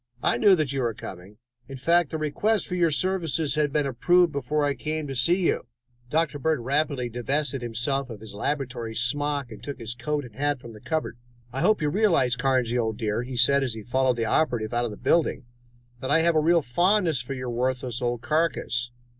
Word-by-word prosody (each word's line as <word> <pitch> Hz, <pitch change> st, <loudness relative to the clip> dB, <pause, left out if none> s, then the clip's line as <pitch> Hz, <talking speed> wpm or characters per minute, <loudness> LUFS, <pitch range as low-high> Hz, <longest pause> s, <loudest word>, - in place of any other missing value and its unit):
I -, -, +3 dB
knew 195 Hz, +9 st, +6 dB
that 150 Hz, -5 st, -1 dB
you 135 Hz, -, -1 dB
were 115 Hz, -3 st, -1 dB
coming; 95 Hz, +2 st, -10 dB, 0.3 s
in 135 Hz, -, -8 dB
fact, 170 Hz, +3 st, +3 dB
the 160 Hz, -, -3 dB
request 175 Hz, +9 st, 0 dB
for -, -, -6 dB
your 175 Hz, -2 st, +3 dB
services 160 Hz, -4 st, 0 dB
had 150 Hz, -1 st, +1 dB
been 150 Hz, -1 st, +1 dB
approved 175 Hz, +7 st, +3 dB
before 145 Hz, +1 st, 0 dB
I 145 Hz, -, +1 dB
came 155 Hz, +1 st, -3 dB
here 135 Hz, -, -5 dB
to -, -, -7 dB
see 175 Hz, +9 st, +2 dB
you." -, -, 0 dB, 0.4 s
Dr. 150 Hz, -1 st, 0 dB
Bird 155 Hz, -2 st, 0 dB
rapidly 140 Hz, 0 st, 0 dB
divested 135 Hz, +3 st, -2 dB
himself 120 Hz, +4 st, -2 dB
of 110 Hz, -3 st, -8 dB
his 110 Hz, -1 st, -10 dB
laboratory 120 Hz, -1 st, -3 dB
smock 140 Hz, +2 st, -1 dB
and 110 Hz, -, -10 dB
took 145 Hz, -, -5 dB
his 115 Hz, -2 st, -5 dB
coat 145 Hz, +4 st, -3 dB
and 120 Hz, -, -13 dB
hat 145 Hz, +2 st, -1 dB
from 120 Hz, -2 st, -11 dB
a -, -, -11 dB
cupboard. 155 Hz, -4 st, -3 dB, 0.3 s
"I 135 Hz, -, -2 dB
hope 200 Hz, -1 st, +3 dB
you 150 Hz, -, +2 dB
realize, 165 Hz, -, +3 dB
Carnsey, 125 Hz, -1 st, +1 dB
old 110 Hz, -2 st, -1 dB
dear," 110 Hz, -1 st, -1 dB
he 125 Hz, 0 st, -6 dB
said 140 Hz, +3 st, +4 dB
as 125 Hz, -4 st, -2 dB
he 110 Hz, -, -7 dB
followed 130 Hz, +1 st, +1 dB
the 115 Hz, -, 0 dB
operative 115 Hz, -3 st, 0 dB
out 120 Hz, 0 st, +1 dB
of -, -, -2 dB
the 105 Hz, -, -8 dB
building, 150 Hz, 0 st, +1 dB, 0.5 s
"that 130 Hz, -, -4 dB
I 160 Hz, +3 st, +4 dB
have 170 Hz, 0 st, +3 dB
a -, -, +5 dB
real 165 Hz, +1 st, +3 dB
fondness 175 Hz, -, +2 dB
for 135 Hz, +2 st, -5 dB
your 125 Hz, -1 st, -4 dB
worthless 125 Hz, 0 st, -2 dB
old 120 Hz, -1 st, -1 dB
carcass. 150 Hz, -6 st, 0 dB
135 Hz, 220 wpm, -26 LUFS, 120-155 Hz, 0.5 s, knew